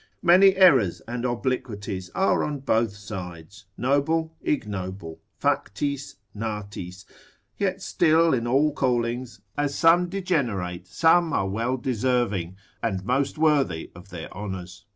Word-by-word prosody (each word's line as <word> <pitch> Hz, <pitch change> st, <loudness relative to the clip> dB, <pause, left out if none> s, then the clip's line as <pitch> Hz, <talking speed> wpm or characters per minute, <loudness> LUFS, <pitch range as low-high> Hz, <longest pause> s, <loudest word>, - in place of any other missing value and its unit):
Many 185 Hz, +2 st, +6 dB
errors 135 Hz, -, +5 dB
and 120 Hz, +1 st, -3 dB
obliquities 110 Hz, -6 st, -3 dB
are 195 Hz, -, +2 dB
on 145 Hz, -2 st, -3 dB
both 115 Hz, -5 st, +1 dB
sides, 95 Hz, -2 st, -9 dB
noble, 160 Hz, +5 st, +1 dB
ignoble, 95 Hz, -, -3 dB, 0.2 s
factis, 140 Hz, +7 st, -1 dB, 0.2 s
natis; 100 Hz, -4 st, -6 dB, 0.5 s
yet 195 Hz, -1 st, -1 dB
still 165 Hz, -1 st, +3 dB
in 120 Hz, -2 st, 0 dB
all 140 Hz, +5 st, +3 dB
callings, 120 Hz, -2 st, -1 dB
as 145 Hz, -1 st, -1 dB
some 175 Hz, +2 st, +4 dB
degenerate, 115 Hz, -, -2 dB
some 165 Hz, -, +3 dB
are 95 Hz, -, +1 dB
well 115 Hz, +6 st, -1 dB
deserving, 120 Hz, -8 st, -1 dB, 0.3 s
and 95 Hz, -5 st, -2 dB
most 135 Hz, +5 st, 0 dB
worthy 145 Hz, -, +1 dB
of 90 Hz, +3 st, -14 dB
their 85 Hz, -3 st, -8 dB
honours. 95 Hz, -1 st, -7 dB
120 Hz, 120 wpm, -25 LUFS, 100-150 Hz, 0.5 s, Many